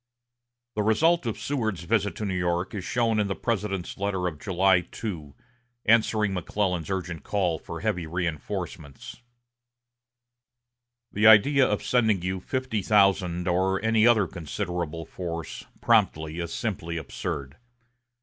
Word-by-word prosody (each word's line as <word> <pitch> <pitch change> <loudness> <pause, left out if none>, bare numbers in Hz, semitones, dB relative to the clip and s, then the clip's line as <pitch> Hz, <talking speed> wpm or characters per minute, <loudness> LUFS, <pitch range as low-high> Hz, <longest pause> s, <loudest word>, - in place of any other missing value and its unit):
The 105 - -1
result 150 +8 +3
of 115 - -2
Seward's 110 - -2
visit 105 +1 0
to 110 - -4
New 95 - -2
York 90 0 -1
is 100 -3 -4
shown 115 +2 +1
in 105 - +1
the 95 - -2
President's 100 -6 -3
letter 100 -2 -1
of 80 -4 -3
July 95 0 +3
2, 80 -10 -6 0.5
answering 110 -2 +3
McClellan's 90 -1 -2
urgent 90 -4 -3
call 90 -2 -1
for - - -8
heavy 90 -2 -1
reinforcements: 85 - -5 1.9
"The 105 +2 +3
idea 130 +5 +7
of 105 - -1
sending 110 -7 +2
you 95 +1 -2
fifty 130 +1 -2
thousand, 95 -4 +2
or 95 +2 +1
any 110 0 +4
other 110 -4 +5
considerable 85 -2 -4
force, 85 -1 -6 0.2
promptly, 80 +2 +2
is 85 -1 -4
simply 85 -7 -3
absurd. 70 -2 -5
95 Hz, 130 wpm, -26 LUFS, 85-110 Hz, 1.9 s, idea